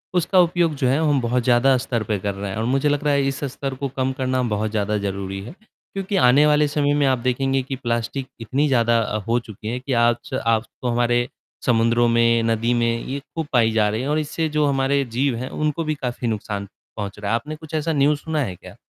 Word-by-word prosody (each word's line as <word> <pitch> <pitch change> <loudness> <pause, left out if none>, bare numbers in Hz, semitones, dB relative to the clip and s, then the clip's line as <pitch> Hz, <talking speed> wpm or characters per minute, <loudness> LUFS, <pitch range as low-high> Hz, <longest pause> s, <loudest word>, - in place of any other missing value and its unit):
उसका 180 +2 +3
उपयोग 170 -2 +3
जो 130 -2 0
है 135 +3 +3
हम 145 -2 +3
बहुत 120 +1 0
ज़्यादा 125 +2 +4
स्तर 120 -3 -2
पे 105 -1 -1
कर 100 +1 -2
रहे 100 0 -5
हैं 100 - -5
और 110 - -1
मुझे 135 +4 +1
लग 145 0 0
रहा 145 -1 +2
है 140 -1 +2
इस 135 +1 -3
स्तर 135 -1 -4
को 140 +1 -3
कम 130 0 +1
करना 130 0 0
बहुत 105 +1 -1
ज़्यादा 105 -1 0
ज़रूरी 95 -1 -4
है 120 - -9
क्योंकि 195 -2 -7
आने 140 +4 +6
वाले 150 0 +4
समय 145 0 +1
में 140 - +3
आप 130 -1 +3
देखेंगे 135 +2 0
कि 135 +1 -4
प्लास्टिक 120 +1 -3
इतनी 135 +7 0
ज़्यादा 115 -3 +3
अ, 110 -1 -1
हो 120 +1 +2
चुकी 110 -3 -10
है 120 +2 -2
कि 130 +1 -3
आज 120 +2 -1
आज 115 -1 +2 0.2
तो 125 - -2
हमारे 120 0 +1 0.4
समुद्रों 120 0 +3
में, 115 0 +3
नदी 115 +1 +1
में 115 -1 +1
ये 140 +2 -3
खूब 160 +2 -6
पाई 115 -3 +4
जा 110 -1 +2
रहे 110 +3 -2
हैं 135 - -3
और 150 +1 +1
इससे 155 +1 -2
जो 150 0 +1
हमारे 140 0 +1
जीव 135 -2 +2
हैं 125 +2 -5
उनको 155 +2 -1
भी 155 0 -1
काफ़ी 125 -3 -4
नुकसान 105 -2 -3 0.3
पहुँच 100 -1 -5
रहा 105 0 -3
है। - - +3
आपने 150 +7 -4
कुछ 155 0 -13
ऐसा 160 +1 0
न्यूज़ 145 0 +2
सुना 160 0 -2
है 95 -9 -3
क्या? - - -13
125 Hz, 240 wpm, -22 LUFS, 115-145 Hz, 0.4 s, आने